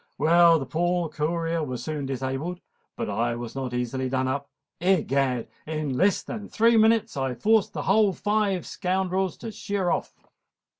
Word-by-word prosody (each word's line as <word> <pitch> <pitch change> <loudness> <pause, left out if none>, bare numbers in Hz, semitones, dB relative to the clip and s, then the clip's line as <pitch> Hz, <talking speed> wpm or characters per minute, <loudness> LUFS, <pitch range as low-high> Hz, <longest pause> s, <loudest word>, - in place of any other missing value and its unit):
Well, 170 +2 +6
the 140 - -4
poor 175 +2 0
courier 165 +2 -1
was 125 -4 -4
soon 150 -2 -3
disabled; 135 +7 -3 0.4
but - - -3
I 120 +1 -1
was 120 -1 -6
not 130 -2 -4
easily 125 +2 -2
done 130 0 0
up. 140 +2 -3 0.3
Egad! 140 -9 +1 0.2
in 155 -4 -2
less 195 +8 +2
than 210 -3 -7
three 230 +1 +3
minutes 220 0 +3
I 135 -2 -1
forced 215 - +2
the - - -3
whole 205 +1 +4
five 205 -1 0
scoundrels 185 0 -1
to 225 - -7
sheer 200 -3 -2
off." - - -2
165 Hz, 160 wpm, -26 LUFS, 135-190 Hz, 0.4 s, Well